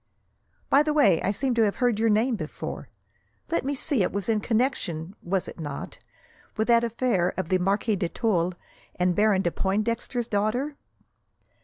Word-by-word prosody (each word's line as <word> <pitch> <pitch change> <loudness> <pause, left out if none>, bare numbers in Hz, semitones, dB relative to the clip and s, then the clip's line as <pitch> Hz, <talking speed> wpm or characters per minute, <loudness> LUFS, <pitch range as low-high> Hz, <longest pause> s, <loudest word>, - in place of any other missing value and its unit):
"By 280 - +5
the 300 0 0
way, 200 - +4
I - - 0
seem 255 +6 0
to 235 - +2
have 205 -2 +2
heard 245 -4 +1
your 225 0 +3
name 225 +4 +2
before. 155 -7 -6 0.6
Let 335 - +1
me 280 +2 -1
see, 275 -3 +1
it 185 - +1
was 200 +2 -3
in 220 -1 +2
connection, 210 - -1
was 185 +1 -1
it - - -9
not, 145 -3 -6 0.6
with 220 +2 0
that 235 0 +5
affair 230 -6 0
of 185 -3 -3
the 185 - +2
Marquis 200 +3 +1
de 175 -3 -1
Tulle 180 -6 0 0.4
and 180 0 +1
Baron 205 -2 +3
de 175 - +1
Pointdexter's 230 +5 -1
daughter?" 240 +8 -1
215 Hz, 175 wpm, -26 LUFS, 185-240 Hz, 0.6 s, By